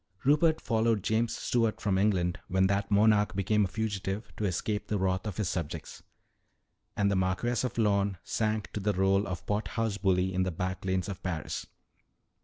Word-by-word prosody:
"Rupert 155 +3 +4
followed 110 -3 +1
James 115 +1 0
Stuart 115 -3 0
from 95 -3 +1
England 95 -3 +1
when 95 +1 +2
that 100 +1 0
monarch 105 0 +4
became 105 +2 +2
a - - +1
fugitive 100 0 -3
to 105 - -2
escape 105 +3 -2
the 105 - 0
wrath 95 +1 0
of 100 - -5
his 105 -4 0
subjects. 85 -5 -4 1.0
And 100 0 +2
the - - +1
Marquess 95 +7 0
of 125 - -3
Lorne 100 -3 +2
sank 110 +1 -1
to - - -2
the 105 +1 0
role 95 +1 +2
of 90 -3 -5
pot 105 +1 -1
house 110 -3 -2
bully 95 -1 +2
in 95 - +1
the 95 - +1
back 95 +2 -4
lanes 95 -1 0
of 100 -3 -6
Paris." 85 -4 -4
100 Hz, 185 wpm, -29 LUFS, 95-110 Hz, 1.0 s, Rupert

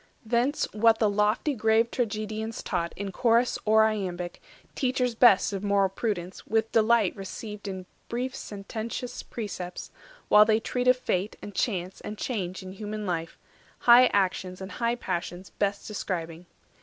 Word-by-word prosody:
260 - - -14 0.5
Thence 210 - -7
what 225 -1 +7
the 220 - +3
lofty 210 +8 +1
grave 225 0 +2
Tragedians 220 -1 -3
taught 170 0 -2
In 200 -1 -4
chorus 235 +4 +2
or 220 0 +5
iambic, 185 -5 -2 0.3
teachers 250 -2 0
best 220 -3 +5
Of 195 0 -4
moral 200 -1 +3
prudence, 190 -3 -4
with 225 0 +1
delight 225 -3 +3
received 210 +1 -7
In 190 -2 -5 0.2
brief 250 +2 -3
sententious 220 +4 -5
precepts, 185 -6 -6 0.4
while 210 - +8
they 215 0 +3
treat 250 +2 -2
Of 255 0 +6
fate, 200 -4 -1
and 205 - -7
chance, 185 -4 -2
and 210 - -6
change 190 -6 -3
in 185 - -8
human 210 +2 -5
life, 165 -3 -3 0.4
High 245 +1 +8
actions 185 -2 0
and 190 +1 -7
high 235 0 0
passions 180 -3 -4
best 200 0 -1
describing. 175 -5 -4
210 Hz, 155 wpm, -27 LUFS, 190-230 Hz, 0.5 s, while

